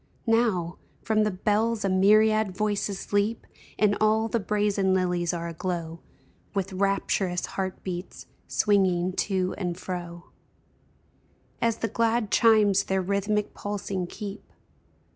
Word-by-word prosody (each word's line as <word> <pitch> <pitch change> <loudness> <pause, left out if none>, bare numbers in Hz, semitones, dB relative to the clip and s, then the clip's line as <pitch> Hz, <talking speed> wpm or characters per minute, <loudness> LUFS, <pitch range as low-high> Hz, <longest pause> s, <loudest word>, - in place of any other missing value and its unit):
Now, 220 -7 +1 0.2
from 215 -1 +2
the - - +2
bells 210 +3 0
a - - +1
myriad 210 +1 +4
voices 205 -2 -2
leap. 205 +3 +1 0.3
And 205 -1 +3
all 220 +1 +3
the 235 +1 0
brazen 200 -2 +1
lilies 180 -2 0
are 170 -1 -4
aglow 170 -1 -4 0.6
With 195 -1 -2
rapturous 190 -1 0
heart 190 -1 -4
beats, 180 0 -6 0.2
swinging 185 -3 +2
to 185 -2 0
and 175 -3 -2
fro 175 -2 -7 1.3
As 230 -1 +1
the 230 - -1
glad 230 -2 0
chimes 210 -4 +4
their 190 0 0
rhythmic 200 +2 -1
pulsing 195 -3 -4
keep. 205 +2 -8
200 Hz, 125 wpm, -26 LUFS, 185-215 Hz, 1.3 s, myriad